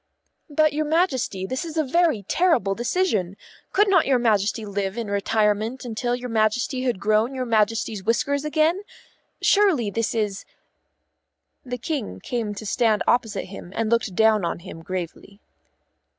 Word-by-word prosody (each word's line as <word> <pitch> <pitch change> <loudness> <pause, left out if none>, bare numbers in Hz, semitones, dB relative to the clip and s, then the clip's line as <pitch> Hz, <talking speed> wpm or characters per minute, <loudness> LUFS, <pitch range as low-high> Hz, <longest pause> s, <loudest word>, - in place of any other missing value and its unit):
"But, 305 0 +2
your 305 +1 -1
Majesty, 285 - 0
this 260 - -3
is 330 -1 -7
a 315 - +3
very 305 - +1
terrible 250 - +2
decision. 225 - -1 0.3
Could 415 +2 +3
not 370 -4 +4
your 265 -2 +4
Majesty 220 -2 +1
live 200 0 -3
in 225 -4 -4
retirement 215 +4 0
until 240 +1 -1
your 250 0 -6
Majesty 230 +4 0
had 245 -6 -1
grown 215 +5 +1
your 255 -1 -2
Majesty's 220 -2 0
whiskers 280 +6 0
again? 310 +4 +1 0.6
Surely 355 - +3
this 230 +2 -1
is 210 -3 -1 0.7
" - - -54
The 250 - -1
King 245 - -4
came 220 - -3
to 210 - -7
a - - -10
stand 215 +1 +1
opposite 225 -4 +1
him 185 -2 -10
and 225 0 -1
looked 230 -5 +1
down 220 -1 +4
on 170 0 -3
him 170 -3 -10
gravely. 185 +3 -6
230 Hz, 160 wpm, -23 LUFS, 205-275 Hz, 0.7 s, not